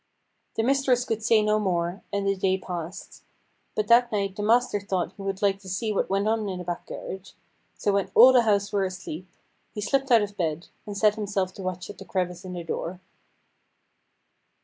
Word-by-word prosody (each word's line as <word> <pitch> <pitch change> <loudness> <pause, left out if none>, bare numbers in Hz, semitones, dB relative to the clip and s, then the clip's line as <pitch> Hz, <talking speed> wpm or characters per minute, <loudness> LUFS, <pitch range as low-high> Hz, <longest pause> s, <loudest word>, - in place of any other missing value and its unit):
The 225 - +1
mistress 260 -1 +2
could 225 -2 -2
say 220 -1 +4
no 210 0 +2
more, 175 -2 -1
and 200 0 -1
the 195 - +2
day 190 0 +1
passed. 175 -1 -7 0.5
But 210 -1 0
that 240 +1 +6
night 200 -2 -1
the 205 - -4
master 230 0 +3
thought 190 -3 -2
he - - -10
would 195 0 -3
like 195 -1 +2
to 190 -1 -11
see 215 +3 -1
what - - 0
went 195 +2 +1
on 220 -2 0
in 185 - -4
the 180 - -5
back 175 0 -4
garret: 190 +1 -7 0.4
so 205 - +1
when 195 -1 +1
all 255 +3 +9
the 250 - +7
house 200 -3 +1
were 200 -1 +2
asleep, 185 -2 -5 0.5
he - - -4
slipped 270 +6 0
out 230 -4 +6
of 205 0 -5
bed, 165 -2 -2 0.2
and 205 -1 -5
set 210 0 +4
himself 200 -3 -2
to 195 - -9
watch 185 -1 -4
at - - -15
the 195 - -9
crevice 180 -2 -2
in 185 -1 -7
the 175 -1 -5
door. 170 +2 -4
200 Hz, 210 wpm, -26 LUFS, 185-215 Hz, 0.5 s, all